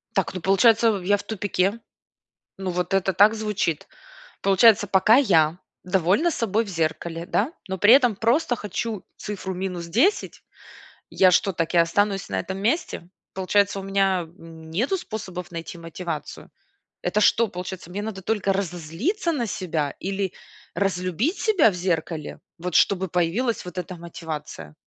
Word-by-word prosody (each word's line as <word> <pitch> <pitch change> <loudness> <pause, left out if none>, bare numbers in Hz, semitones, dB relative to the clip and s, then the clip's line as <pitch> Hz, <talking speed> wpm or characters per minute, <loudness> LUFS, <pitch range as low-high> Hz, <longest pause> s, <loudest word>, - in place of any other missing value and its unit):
Так, 195 -2 0
ну 185 - -4
получается, 225 +5 +4
я 205 +3 +3
в - - -9
тупике. 205 0 -1 0.8
Ну, 190 -1 -3
вот 180 +1 -2
это 195 -1 +1
так 205 +4 +6
звучит. 210 -7 -2 0.5
Получается, 205 +2 +5
пока 200 +4 +5
я 170 - +3 0.2
довольна 190 - +2
собой 225 -4 0
в 210 - -9
зеркале, 165 0 -2
да, 220 - 0 0.2
но 190 0 -3
при 205 +4 +5
этом 245 -5 +5
просто 245 +5 +1
хочу 210 -1 -4
цифру 190 -2 -5
минус 180 -2 -4
10, 265 - +1 0.7
я 185 - +5
что, 190 +2 +2
так 165 +1 -2
и - - +5
останусь 195 +4 +2
на - - -1
этом 190 +2 -5
месте? 220 - -1 0.3
Получается, 200 +1 +1
у - - -7
меня, 195 -1 +1
м, 165 -1 -12
нету 245 - 0
способов 185 - -7
найти 165 +1 -7
мотивацию? 165 -2 -7 0.5
Это 205 +4 0
что, 225 +2 +4
получается, 180 -1 -7
мне 195 +3 -5
надо 210 -2 -5
только 200 0 0
разозлиться 195 - -2
на 250 -7 -1
себя 160 -8 -2
или 195 -1 -3 0.4
разлюбить 195 - -1
себя 390 - +4
в - - -7
зеркале, 165 -3 -3 0.2
вот 175 0 -5
чтобы 190 -1 +3
появилась 180 +8 0
вот 180 0 -8
эта 180 0 -5
мотивация? 155 - -8
190 Hz, 150 wpm, -24 LUFS, 175-215 Hz, 0.8 s, так